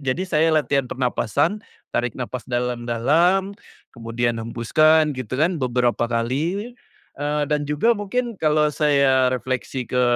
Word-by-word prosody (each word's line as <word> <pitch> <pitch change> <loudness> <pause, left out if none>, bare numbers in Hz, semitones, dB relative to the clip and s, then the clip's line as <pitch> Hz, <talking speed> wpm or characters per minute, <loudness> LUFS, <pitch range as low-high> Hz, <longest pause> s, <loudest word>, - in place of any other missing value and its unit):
Jadi, 130 +8 0
saya 160 -1 +2
latihan 140 -3 +1
pernafasan, 135 - -1 0.3
tarik 120 -2 0
nafas 125 -1 -6
dalam-dalam, 125 - +1 0.4
kemudian 115 0 -2
hembuskan, 150 +7 +2
gitu 130 -3 -7
kan, 170 +3 +2
beberapa 125 -3 0
kali, 150 - -2 0.4
eee, 150 +1 -1
dan 150 -1 0
juga 150 +11 +1
mungkin, 230 +3 -3
kalau 155 -1 +2
saya 140 -4 +2
refleksi 130 0 -3
ke, 125 0 +1
140 Hz, 125 wpm, -22 LUFS, 125-155 Hz, 0.4 s, saya